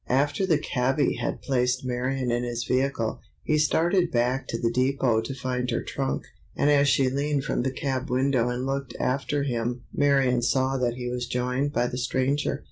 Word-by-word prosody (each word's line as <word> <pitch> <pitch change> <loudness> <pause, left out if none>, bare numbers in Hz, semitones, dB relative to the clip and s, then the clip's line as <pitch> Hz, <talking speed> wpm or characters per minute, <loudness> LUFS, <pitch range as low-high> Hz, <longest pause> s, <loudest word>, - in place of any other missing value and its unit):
After 145 +8 +1
the 160 -4 +4
"cabby" 135 0 0
had - - -3
placed 125 -1 0
Marion 125 0 -1
in 120 +1 0
his 120 -1 -2
vehicle, 130 -3 -1 0.2
he 155 0 +1
started 175 +4 +2
back 125 +2 0
into 115 - -2
the 115 0 0
depot 130 -3 +2
to 125 +4 -5
find 125 -1 -2
her - - -1
trunk, 135 -1 -2 0.3
and 145 - +3
as 145 -1 +4
she 135 -1 +3
leaned 140 +1 0
from - - -1
the 130 - 0
cab 130 0 -3
window 130 -1 +2
and 125 +1 -2
looked 135 -2 -3
after 140 +2 0
him 120 -2 -2
Marion 135 -3 +3
saw 130 +2 +1
that 120 -2 0
he 125 0 -5
was 125 0 -3
joined 125 +3 -1
by 120 -4 +1
the 125 +1 -3
stranger. 135 +3 0
130 Hz, 190 wpm, -26 LUFS, 125-140 Hz, 0.3 s, the